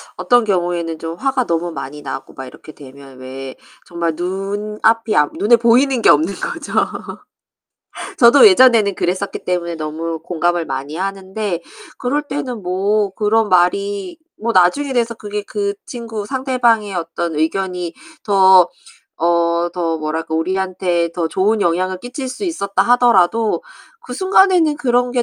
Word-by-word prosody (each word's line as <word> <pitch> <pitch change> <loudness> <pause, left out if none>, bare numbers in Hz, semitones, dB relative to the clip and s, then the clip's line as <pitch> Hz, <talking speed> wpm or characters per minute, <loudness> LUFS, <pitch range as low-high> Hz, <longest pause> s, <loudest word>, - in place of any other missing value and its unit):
어떤 245 -1 +3
경우에는 175 -5 -1
좀 165 0 -5
화가 265 +2 -1
너무 170 +1 -2
많이 145 0 -8
나고 135 -1 -7
막 130 - -8
이렇게 140 +4 -13
되면 135 -1 -14
왜 130 +1 -8 0.3
정말 170 -2 -2
눈앞이 210 +5 -1
안 150 0 +3
눈에 230 +4 +5
보이는 240 +2 +3
게 - - +6
없는 160 +7 +3
거죠. - - -6 1.5
저도 255 - +7
예전에는 235 - +5
그랬었기 185 +3 -3
때문에 170 -2 -2
너무 160 +1 -4
공감을 175 0 -1
많이 135 +3 -5
하는데 195 -1 -4 0.3
그럴 275 +4 -1
때는 265 -7 -5
뭐 195 +3 0
그런 215 0 +1
말이 190 +1 +1 0.2
뭐 230 +2 -2
나중에 265 +11 +3
돼서 235 -2 0
그게 210 -1 -5
그 200 -1 -3 0.2
친구 225 -4 -6
상대방의 240 -6 0
어떤 170 -1 -3
의견이 180 +1 -2 0.3
더 190 -3 +5 0.5
어 170 +1 +1
더 165 -2 -1
뭐랄까 160 +1 -4
우리한테 180 0 -1
더 170 -2 -2
좋은 205 +5 +1
영향을 185 +2 0
끼칠 255 +3 -6
수 255 +10 -6
있었다 200 - -1
하더라도 230 -3 +3 0.4
그 250 - -8
순간에는 370 -2 +3
그런 245 -3 +1
게 245 -1 0
190 Hz, 295 characters per minute, -18 LUFS, 170-230 Hz, 1.5 s, 저도